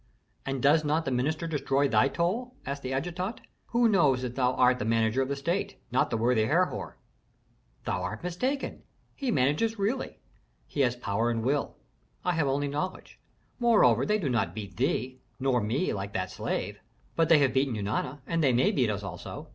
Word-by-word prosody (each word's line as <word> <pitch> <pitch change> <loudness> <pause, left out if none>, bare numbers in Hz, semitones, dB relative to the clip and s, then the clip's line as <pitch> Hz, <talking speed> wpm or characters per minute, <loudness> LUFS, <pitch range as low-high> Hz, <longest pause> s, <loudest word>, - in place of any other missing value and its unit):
"And 135 -2 -2
does 155 +3 +5
not 155 +2 0
the 135 - -1
minister 150 +6 0
destroy 140 -3 +1
thy 110 0 +4
toil?" 220 - -1
asked 140 +1 -4
the 130 - -4
adjutant. 175 - -3 0.3
"Who 240 0 +3
knows 150 - +3
that 125 -2 -3
thou 125 -1 +1
art 125 0 +4
the - - -1
manager 115 +2 +2
of 130 - 0
the 140 - -2
state, 175 +8 -2
not 125 - +2
the - - -1
worthy 115 -1 +2
Herhor?" 145 - 0 0.9
"Thou 90 - -1
art 95 - -5
mistaken. 250 +11 -2 0.3
He 275 -3 -3
manages 155 - +1
really. 220 +7 -2 0.5
He - - -7
has 125 -3 +3
power 115 -1 -1
and 115 -1 -1
will; 140 +4 -1 0.5
I 180 - +3
have 160 -4 +1
only 140 +1 0
knowledge. 150 +6 -4 0.4
Moreover, 210 - +5
they 210 +9 +2
do 180 -9 -2
not 105 -9 0
beat 100 -4 -7
thee, 130 -1 -1 0.2
nor 130 -2 +2
me, 125 - 0
like 100 0 -5
that 95 0 -2
slave." - - -3 0.4
"But 165 -1 +2
they 165 - +8
have 140 -3 +3
beaten 135 -2 +1
Eunana, 110 +7 -2
and 165 -1 0
they 135 -3 +4
may 125 +2 +3
beat 125 -5 +1
us 105 -1 -2
also. 100 - -7
135 Hz, 190 wpm, -28 LUFS, 120-170 Hz, 0.9 s, they